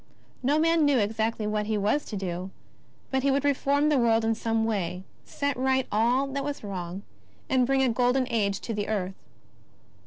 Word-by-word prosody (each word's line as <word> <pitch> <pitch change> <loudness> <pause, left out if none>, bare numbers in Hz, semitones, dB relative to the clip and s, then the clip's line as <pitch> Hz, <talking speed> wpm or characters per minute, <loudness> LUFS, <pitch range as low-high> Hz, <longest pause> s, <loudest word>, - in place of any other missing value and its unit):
No 280 +4 +2
man 330 0 +3
knew 285 -2 +4
exactly 220 0 0
what 210 0 -1
He 215 -1 0
was 210 +9 +1
to 215 - -6
do, 185 -1 -4 0.6
but 265 0 +1
He 280 - +2
would 275 +1 +1
reform 285 +1 +2
the 290 -3 +3
world 225 -1 +3
in 225 - +2
some 225 0 0
way, 185 -4 -2 0.2
set 285 -1 -2
right 265 +1 +1
all 240 +6 +2
that 275 0 -3
was 290 -3 -4
wrong, 185 -1 -5 0.5
and 255 -2 +3
bring 270 0 +2
a 260 - +3
golden 250 +2 +2
age 200 -3 0
to 230 - -4
the 205 -1 -2
earth. 195 -3 -2
230 Hz, 190 wpm, -27 LUFS, 210-270 Hz, 0.6 s, knew